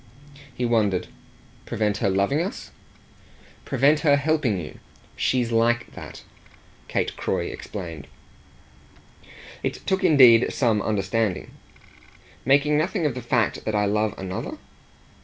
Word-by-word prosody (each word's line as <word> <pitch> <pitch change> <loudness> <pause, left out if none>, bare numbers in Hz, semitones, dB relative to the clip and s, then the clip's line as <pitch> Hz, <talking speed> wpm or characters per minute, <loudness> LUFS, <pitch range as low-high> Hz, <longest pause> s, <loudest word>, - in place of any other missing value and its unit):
He 125 0 -3
wondered. 105 -6 +1 0.6
"Prevent 105 -1 -1
her 100 - 0
loving 100 +11 +1
us?" 185 - -5 0.9
"Prevent 145 +3 +3
her 150 -2 +4
helping 140 - 0
you. 75 - -9 0.4
She's 125 -2 0
LIKE 120 +1 +1
that," - - -10 0.6
Kate - - -1
Croy - - -2
explained. 85 -7 -7 1.5
It - - -4
took 190 0 0
indeed 125 -6 +6
some 115 -5 +1
understanding. 105 0 -1 0.9
"Making 145 +3 +3
nothing 175 +1 -1
of 145 - +1
the 125 - -6
fact 120 -2 0
that 110 - -2
I 105 0 +2
love 105 +1 0
another?" 95 -1 -5
115 Hz, 120 wpm, -24 LUFS, 105-140 Hz, 1.5 s, indeed